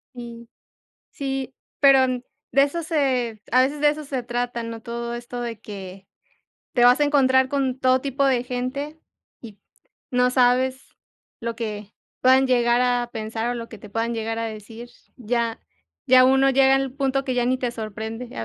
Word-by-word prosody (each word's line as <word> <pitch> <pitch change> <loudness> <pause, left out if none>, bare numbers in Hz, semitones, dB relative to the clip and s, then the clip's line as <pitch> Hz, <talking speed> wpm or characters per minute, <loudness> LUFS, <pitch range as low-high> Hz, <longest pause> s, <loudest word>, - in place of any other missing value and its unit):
Y, 235 -1 -9 0.6
sí, 270 -2 -4 0.2
pero 270 -2 +6 0.4
de 275 - +5
eso 325 +4 -2
se 255 -8 0
a 255 +2 +5
veces 285 +3 -1
de 295 - +5
eso 305 +1 -4
se 270 -2 -3
trata, 240 0 -3
¿no?, 230 0 -7
todo 235 +1 -5
esto 240 +1 -6
de 230 -3 -5
que 195 -3 -10 0.7
te 240 -1 +3
vas 245 +3 +6
a - - +5
encontrar 260 -3 +3
con 265 -2 -1
todo 255 0 +3
tipo 275 +1 -1
de 255 -2 +2
gente 260 +5 -4 0.4
y 215 -4 -12 0.5
no 250 0 +3
sabes 255 +1 +2 0.5
lo 230 -1 -4
que 210 -3 -5 0.3
puedan 260 +1 +5
llegar 240 -1 +3
a 245 -1 +1
pensar 225 +1 -3
o - - -2
lo 230 -1 -6
que 225 - -11
te 210 0 -13
puedan 230 +2 -1
llegar 225 0 -3
a 230 - -2
decir. 220 +2 -9 0.3
Ya 235 -1 -2 0.5
ya 255 0 +7
uno 270 +1 +4
llega 270 0 +5
al 270 -1 -2
punto 270 0 -1
que 255 - -2
ya 245 -1 +1
ni 255 0 +1
te 245 -2 -2
sorprende, 220 +2 -6
a 115 - -3
245 Hz, 180 wpm, -23 LUFS, 230-265 Hz, 0.7 s, ya